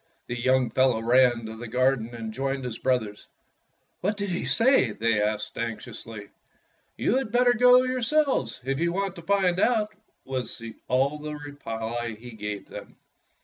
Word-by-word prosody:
The 120 - -4
young 130 -1 +2
fellow 130 -2 +3
ran 120 0 +3
to 110 0 -6
the 120 +1 -7
gar 130 +3 +3
den 120 -1 -7
and 110 -1 -6
joined 135 +1 -2
his 115 -3 -5
brothers. 110 -6 -1 0.7
"What 205 +3 -1
did 200 -1 -2
he 175 - -2
say.^^" 230 - +3
they 115 -1 +2
asked 105 0 -2
anx 115 -1 -3
iously. 110 -3 -9 0.7
"You 245 - +2
had 265 -6 -2
better 245 +1 +4
go 250 +1 +6
yourselves, 255 - 0
if 135 +2 -2
you 170 +1 +1
want 195 0 -2
to - - -7
find 185 0 +2
out," 215 -2 +2 0.3
was 130 -3 -4 0.3
all 135 +4 +1
the 150 0 -5
reply 120 -5 -5
he 120 +1 -10
gave 105 -2 -6
them. - - -10
130 Hz, 170 wpm, -26 LUFS, -, 0.7 s, go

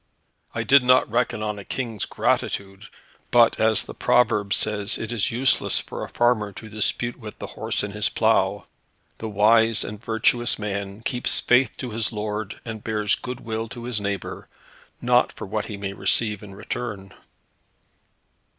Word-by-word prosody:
"I - - -1
did 140 0 +6
not 125 +1 +4
reckon 120 -2 0
on 105 -1 -3
a - - -8
King's 115 -1 -4
gratitude; 95 -1 -1 0.4
but 120 -1 +5
as 110 -1 +4
the - - -9
proverb 105 -5 +2
says, 105 0 +1
it 115 0 -5
is 115 -1 +1
useless 125 +2 +2
for - - -6
a - - -6
farmer 120 -4 +1
to 110 - -10
dispute 110 +3 -1
with 110 -3 -9
the - - -6
horse - - -1
in 105 - -4
his 105 +1 0
plough. - - +1 0.5
The 110 - -4
wise 110 +2 +4
and 105 +2 -7
virtuous 120 +1 +1
man 100 0 -4
keeps 125 +1 +1
faith 125 -1 +3
to 125 - -5
his 110 0 -2
lord, 105 -1 -4
and 110 -2 -6
bears 105 -2 0
goodwill 115 -3 -4
to 120 0 -8
his 120 -3 -3
neighbour, 100 -1 -4 0.5
not - - +3
for - - -7
what 105 +2 -3
he 105 - -6
may 100 -1 -4
receive 105 0 +1
in 100 -2 -10
return." 100 -4 -5
110 Hz, 165 wpm, -24 LUFS, 105-120 Hz, 0.5 s, did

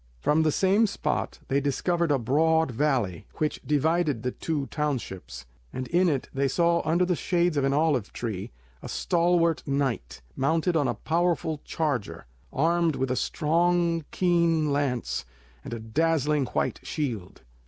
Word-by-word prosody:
From 150 - +2
the 155 -1 +2
same 200 +7 +3
spot 155 -6 -2
they 140 +1 +1
discovered 170 +5 0
a 145 - +3
broad 160 +5 +2
valley, 120 - 0
which 155 -1 -2
divided 150 -3 +1
the 125 - -1
two 150 -1 -3
townships, 120 - -4 0.3
and 130 0 -5
in 175 +1 +3
it 140 -4 -1
they 140 +1 +1
saw 170 +4 +2
under 170 +3 +2
the 180 0 +1
shades 175 -1 +1
of 140 - +1
an 135 - +2
olive 145 -7 +1 0.7
a - - -8
stalwart 170 -1 +2
knight, 135 - -2
mounted 160 +5 +1
on 145 -4 +2
a - - -1
powerful 165 -2 0
charger, 145 - -2 0.3
armed 165 +1 +2
with 130 -1 -1
a - - +1
strong 170 +3 +1
keen 170 -4 +2
lance 140 -4 -1 0.4
and - - -8
a 115 - -4
dazzlingly 150 +3 +1
white - - 0
shield. 120 - -4
150 Hz, 150 wpm, -26 LUFS, 135-170 Hz, 0.7 s, same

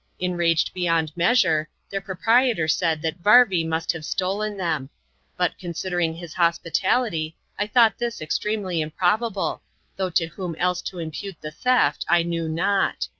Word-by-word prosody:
Enraged 175 -2 +1
beyond 165 -4 0
measure, 170 -5 +2 0.2
their 195 0 -2
proprietor 215 0 +2
said 160 -1 +1
that 165 +2 -3
Varvy 205 -3 +6
must 160 0 -1
have 165 -2 -7
stolen 200 +5 -2
them; 160 -7 -2 0.5
but, 180 -1 0
considering 175 -2 -2
his 170 -1 -9
hospitality, 170 +1 0 0.2
I 205 - 0
thought 225 -1 +4
this 240 -1 -3
extremely 185 +2 -2
improbable, 190 +7 -1 0.4
though 190 -1 -1
to 165 -1 +1
whom 170 +1 -6
else 180 +2 0
to 185 - -12
impute 165 +2 -6
the 155 - -6
theft 250 +10 +2
I 175 0 +4
knew 165 -1 -2
not. 195 +5 0
175 Hz, 145 wpm, -23 LUFS, 165-200 Hz, 0.5 s, Varvy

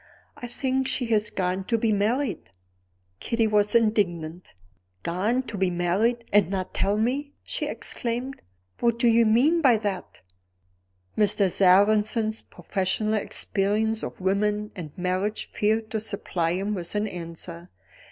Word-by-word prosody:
"I 245 - -7
think 265 +1 -1
she 265 -1 -1
has 210 0 +2
gone 185 0 -2
to 230 - +1
be 225 -1 +1
married." 215 - -1 0.7
Kitty 230 -1 0
was 210 0 +2
indignant. 180 -7 +1 0.6
"Gone 210 +9 0
to 210 -6 -7
be 190 -1 +2
married, 195 +7 0
and 205 -4 +5
not 190 -1 -3
tell 200 +1 +1
me!" 270 +6 -1
she - - -2
exclaimed. 245 +3 -2 0.4
"What 235 -1 +2
do 235 - +2
you 230 0 +5
mean 280 +10 +4
by 255 -6 +5
that?" 200 -4 -5 0.9
Mr. 200 -2 +3
Sarrazin's 215 +4 +3
professional 190 +4 -2
experience 215 +1 0
of - - -6
women 210 +2 0
and 165 -6 -7
marriages 185 +4 -2
failed 220 0 0
to 220 - -1
supply 185 -5 -2
him 195 +3 -2
with 175 -1 -4
an 210 +1 0
answer. 170 -1 -7
210 Hz, 140 wpm, -25 LUFS, 185-230 Hz, 0.9 s, and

